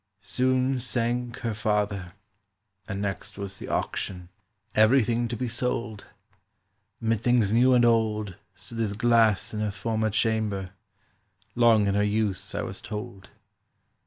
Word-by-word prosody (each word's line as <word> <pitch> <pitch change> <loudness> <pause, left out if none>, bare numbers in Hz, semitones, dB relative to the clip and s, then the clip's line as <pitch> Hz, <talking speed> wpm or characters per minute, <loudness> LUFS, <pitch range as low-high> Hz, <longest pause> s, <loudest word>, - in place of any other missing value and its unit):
"Soon 130 +7 +1
sank 120 0 -2
her 115 -2 -2
father; 105 -4 -1 0.7
and 100 -1 -3
next 100 -1 -5
was 100 -1 -6
the - - -7
auction— 90 -2 -3 0.4
Everything 120 +1 +3
to 120 0 -4
be 125 - -2
sold: 115 -2 -2 0.9
Mid 115 -2 0
things 120 -4 +2
new 125 +2 +5
and 120 -1 +5
old 110 -3 +1 0.2
Stood 115 -2 -9
this 110 -3 0
glass 110 -2 +3
in 105 - -3
her 105 0 0
former 110 +2 -1
chamber, 105 -3 0 0.8
Long 115 -3 +4
in 100 - +1
her 100 - +2
use, 105 -1 0
I - - -1
was - - -6
told. 100 -2 -7
110 Hz, 135 wpm, -26 LUFS, 100-120 Hz, 0.9 s, new